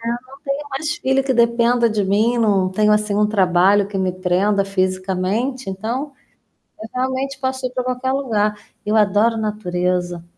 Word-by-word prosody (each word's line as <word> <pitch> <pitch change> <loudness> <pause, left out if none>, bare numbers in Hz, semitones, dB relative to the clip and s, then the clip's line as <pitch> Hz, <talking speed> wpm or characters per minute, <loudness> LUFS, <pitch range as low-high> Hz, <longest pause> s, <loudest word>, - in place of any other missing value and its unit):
é, 230 - -8
eu - - 0
não 235 - -1 0.4
tem 290 +1 -3
mais 300 +3 -3
filho 265 +1 +1
que 265 -1 0
dependa 235 0 +3
de 215 -2 0
mim, 215 +5 +2
não 200 -5 +2
tenho, 210 +2 +2
assim, 210 -1 0
um 210 0 +3
trabalho 195 0 +3
que 200 -1 -5
me 185 -1 0
prenda 190 +2 +1
fisicamente, 195 +6 -2
então 235 +9 -4 0.7
eu 220 - -7
realmente 260 +1 -2
posso 260 -1 -2
ir - - -4
pra 255 - -2
qualquer 255 +1 -1
lugar. 215 -6 0 0.3
Eu 210 +1 0
adoro 210 +2 +3
natureza. 180 -5 -2
215 Hz, 175 wpm, -20 LUFS, 195-255 Hz, 0.7 s, dependa